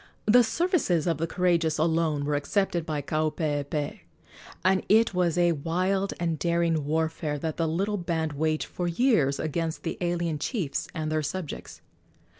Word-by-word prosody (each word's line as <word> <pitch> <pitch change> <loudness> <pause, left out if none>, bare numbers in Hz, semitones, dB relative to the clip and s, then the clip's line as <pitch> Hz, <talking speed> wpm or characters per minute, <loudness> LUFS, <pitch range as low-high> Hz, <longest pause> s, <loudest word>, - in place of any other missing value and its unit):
The 240 +3 +6
services 230 - +1
of 165 -4 0
the 165 - 0
courageous 170 -3 +1
alone 160 -2 +1
were 150 - 0
accepted 170 +3 0
by 150 -2 -2
Kaupeepee, 150 -1 -1 0.7
and 190 0 +3
it 220 0 +5
was 180 -2 +1
a 175 -1 +4
wild 185 +6 0
and 165 -3 -1
daring 170 -2 +1
warfare 160 0 -1
that 155 +1 -3
the 165 - +1
little 195 +6 0
band 165 -4 -2
waged 155 +1 0
for 175 - -4
years 170 - +2
against 160 +1 -2
the 165 - -4
alien 170 -3 -1
chiefs 165 - -2
and 155 -1 -2
their 155 0 +1
subjects. 165 +2 -5
165 Hz, 155 wpm, -27 LUFS, 155-180 Hz, 0.7 s, The